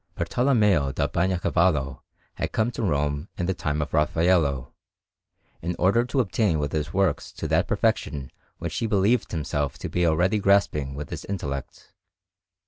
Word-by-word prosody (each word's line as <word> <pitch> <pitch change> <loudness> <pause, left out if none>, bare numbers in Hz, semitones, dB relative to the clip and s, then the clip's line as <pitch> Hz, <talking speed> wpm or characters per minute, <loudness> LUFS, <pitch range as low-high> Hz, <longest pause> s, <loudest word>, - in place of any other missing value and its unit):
Bartolommeo 105 - +2
da - - 0
Bagnacavallo 85 -5 +1 0.3
had - - -3
come 110 +2 +1
to - - -5
Rome 75 -3 -1
in 90 - -1
the 95 - 0
time 75 -4 -1
of - - -9
Raffaello, 75 -4 +2 0.9
in 90 +1 -2
order 100 +7 +3
to 130 +2 +1
attain 100 -4 +1
with 75 -1 -2
his 75 -1 -2
works 95 -6 0
to - - -5
that - - +2
perfection 70 -3 -1 0.3
which 85 -2 -5
he 115 - 0
believed 105 +3 +2
himself 75 -4 -2
to - - -5
be 90 -1 +1
already 90 +6 +2
grasping 95 -9 +2
with 75 0 -7
his - - -5
intellect. 70 -9 -6
85 Hz, 155 wpm, -25 LUFS, 75-100 Hz, 0.9 s, order